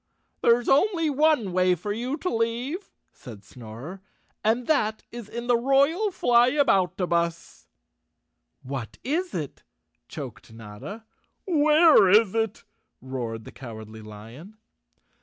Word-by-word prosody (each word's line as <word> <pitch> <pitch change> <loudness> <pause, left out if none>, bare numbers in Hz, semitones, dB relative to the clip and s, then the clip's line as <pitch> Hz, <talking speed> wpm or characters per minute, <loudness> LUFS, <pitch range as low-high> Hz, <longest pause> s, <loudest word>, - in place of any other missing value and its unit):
" - - -48
There's 235 +1 +3
only 330 +1 +2
one 285 - +2
way 185 0 +3
for 205 +5 -4
you 250 +6 -3
to 365 -1 -3
leave," 245 - -2 0.2
said 110 -6 -12
Snorer, 120 - -10 0.2
" - - -43
and 230 +3 +1
that 220 -8 0
is 235 -3 -9
in 235 +1 -6
the 245 0 +3
royal 280 - +2
Flyaboutabus." 195 - +1 1.0
"What 130 -4 -6
is 345 +7 -2
it?" 150 -5 -5 0.5
choked - - -9
Notta. 115 - -10 0.4
"Where 305 - +5
is 210 0 +5
it?" 225 -2 -2 0.4
roared 120 -4 -5
the - - -11
Cowardly 110 -3 -10
Lion. 115 - -12
220 Hz, 120 wpm, -25 LUFS, -, 1.0 s, Where